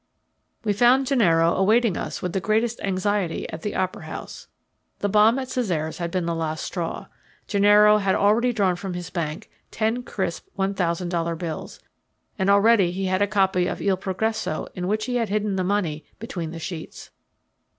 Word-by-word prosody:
We 210 -2 +1
found 245 +5 +4
Gennaro 170 - +3
awaiting 215 +1 +3
us - - -5
with 180 -2 -2
the 190 - +1
greatest 220 +4 0
anxiety 195 -2 -1
at 160 - -7
the 210 - -4
opera 185 0 -2
house. - - -8 0.5
The 205 - -1
bomb 215 +4 +5
at 265 -1 -3
Cesare's 170 -11 -2
had 170 -1 -2
been 180 0 -1
the 170 - -1
last 160 -1 -3
straw. 170 -3 -4 0.4
Gennaro 210 +1 +5
had 195 -2 +1
already 225 +5 +3
drawn 195 -6 +1
from 185 0 -5
his 175 0 -6
bank 170 +2 -4 0.2
ten 225 +3 -1
crisp 185 -8 -4
one 195 0 0
thousand 175 -1 -1
dollar 170 -1 -1
bills, 165 -2 -6 0.6
and 190 +1 +2
already 200 -2 +5
he 190 +2 -3
had 185 +1 0
a 205 - +3
copy 190 -3 +2
of - - -3
Il 195 -1 +1
Progresso 200 -1 -2
in 180 0 -4
which 215 +2 0
he 250 -1 -1
had 230 -4 -1
hidden 210 -1 0
the 185 - 0
money 180 -6 -1
between 175 -7 -5
the 165 - -7
sheets. 165 0 -7
195 Hz, 180 wpm, -24 LUFS, 175-215 Hz, 0.6 s, bomb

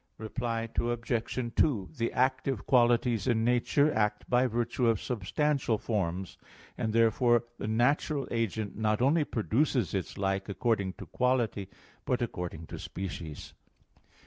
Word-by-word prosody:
Reply 115 +1 -3
Obj. 120 0 -2
2: 115 -12 +2
The 115 -3 -1
active 130 -2 0
qualities 120 -3 +3
in 115 -2 +2
nature 125 +5 +3
act 105 -1 0
by 125 +1 +3
virtue 120 +1 0
of 115 -3 +3
substantial 125 +3 0
forms: 95 -4 -3 0.4
and 110 - -2
therefore 115 +1 +3 0.2
the - - -3
natural 135 +5 +1
agent 110 -3 -2
not 110 -1 +1
only 145 +6 +3
produces 120 - 0
its 95 -2 -3
like 95 0 -1
according 100 -3 0
to - - -10
quality, 120 -6 0 0.3
but 125 - 0
according 90 -7 -5
to - - -8
species. 85 -5 -6
115 Hz, 130 wpm, -30 LUFS, 105-125 Hz, 0.4 s, qualities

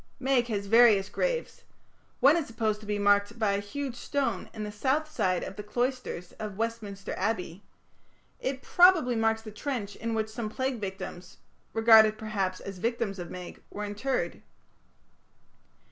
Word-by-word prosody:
Meg 260 -2 +2
has 205 -3 -2
various 215 -2 +5
graves. - - -2 0.6
One 280 +4 +7
is 330 -4 -1
supposed 220 -2 -1
to 215 - -12
be 210 0 0
marked 205 +2 +3
by 215 -3 +2
a 200 - +1
huge 270 +6 -4
stone 280 +2 -2
in 215 -2 -6
the 210 - -4
south 265 +8 0
side 185 - 0
of 195 - -7
the - - -4
cloisters 240 -5 -3
of 210 -3 -5
Westminster 220 -3 -4
Abbey; 185 -4 -2 0.8
it 265 0 -3
probably 350 -9 +5
marks 225 0 +1
the 215 - -8
trench 210 -3 -4
in 230 0 -3
which 220 0 -1
some 220 -1 -4
plague 260 +2 -2
victims 190 -2 -7 0.3
regarded, 220 -1 +6
perhaps, 195 -4 -2
as 195 -2 -8
victims 230 -3 -1
of 175 -1 -6
Meg 180 -1 -8
were 210 +1 -5
interred. 210 +6 -2
220 Hz, 160 wpm, -28 LUFS, 205-245 Hz, 0.8 s, One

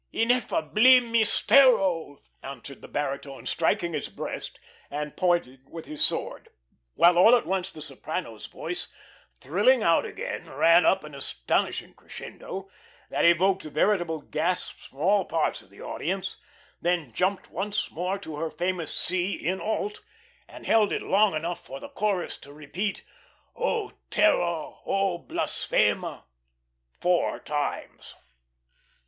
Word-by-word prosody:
"Ineffabil 240 0 +4
mistero," 215 - +4 0.2
answered 135 0 -9
the - - -10
baritone, 140 -1 -4
striking 170 +1 0
his - - -3
breast - - -6 0.3
and 150 0 -5
pointing 170 -8 +1
with 165 -1 -8
his 150 - -1
sword; - - 0 0.5
while 175 0 +5
all 225 +7 +8
at 240 - 0
once 190 0 -1
the 155 -4 -9
soprano's 140 -3 -6
voice, 360 - -4 0.5
thrilling - - +3
out - - +4
again, - - -6
ran 165 +2 +5
up 190 - +3
an 150 -1 -10
astonishing 140 - 0
crescendo 195 +1 -9 0.4
that - - +1
evoked 185 +3 +4
veritable 165 0 0
gasps 175 +5 -2
from 135 - -23
all 195 +3 +4
parts 165 -2 -1
of - - -21
the - - -15
audience, - - -2 0.4
then 170 -8 0
jumped 190 - -1
once 205 +4 -2
more 180 +4 -2
to 160 -7 -8
her 160 +1 -2
famous 175 -2 -1
C 185 +2 +1
in 185 +2 -2
alt, 210 -1 -2 0.5
and - - -12
held 215 -2 +4
it - - -2
long 200 -1 +3
enough 170 +3 -3
for 135 - -8
the - - -9
chorus 200 -4 -1
to 140 - -14
repeat 160 +8 -4 0.5
"O 465 -3 -1 0.2
terror, 170 - +1
O 195 -3 0
blasfema" - - -1 0.8
four 175 0 +1
times. 145 -1 -4
175 Hz, 130 wpm, -26 LUFS, 155-200 Hz, 0.8 s, all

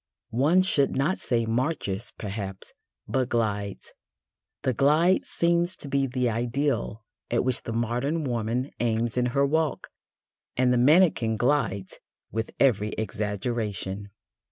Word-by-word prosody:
One 155 +10 +4
should 145 -7 +2
not 140 +8 +1
say 115 -2 0
"marches" 115 -3 -2
perhaps, 100 -2 -6 0.3
but 125 +3 0
glides. 105 -4 -2 0.7
The 130 - +1
glide 155 +8 +3
seems 170 +1 +1
to - - -7
be 135 0 +1
the 125 -1 0
ideal 120 -1 -1 0.3
at 120 - +1
which 130 -1 +1
the - - -6
modern 120 +8 -1
woman 120 +1 -1
aims 115 -1 0
in 125 0 +2
her 140 +3 +2
walk, 155 +1 0 0.7
and 125 0 +3
the - - +3
mannequin 140 -6 +4
glides 120 -7 0 0.3
with 110 +1 -2
every 105 -6 +3
exaggeration. 105 -1 -3
120 Hz, 130 wpm, -26 LUFS, 110-140 Hz, 0.7 s, One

